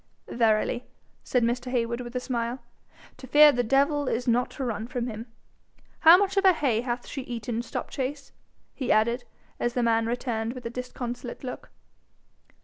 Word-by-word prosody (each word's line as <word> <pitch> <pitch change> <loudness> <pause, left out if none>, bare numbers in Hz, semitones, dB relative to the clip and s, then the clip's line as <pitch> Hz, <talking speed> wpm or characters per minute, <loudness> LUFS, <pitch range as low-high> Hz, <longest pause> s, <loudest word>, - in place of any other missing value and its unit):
'Verily,' 225 +1 +1 0.4
said 250 -2 +1
Mr. 245 +2 -1
Heywood 235 -1 -1
with 240 0 -8
a - - +1
smile, 240 -1 -2 0.6
'to 260 - -11
fear 295 +3 +8
the 245 - 0
devil 280 +4 +2
is 245 +1 -1
not 245 +1 +2
to 270 - -6
run 225 -2 -3
from 245 -1 -3
him! 225 0 -6 0.7
How 325 +2 +9
much 395 0 0
of 390 - +4
her 380 -1 +7
hay 255 -9 +1
hath 245 0 -3
she 275 - -5
eaten, 235 -2 -4
Stopchase?' 270 +3 -5 0.4
he 260 -4 -2
added, 235 +3 +2 0.3
as 240 - -1
the 245 - +1
man 225 -1 +2
returned 230 -1 -2
with 255 -1 -9
disconsolate 245 0 -6
look. 250 - -7
245 Hz, 165 wpm, -27 LUFS, 235-260 Hz, 0.7 s, How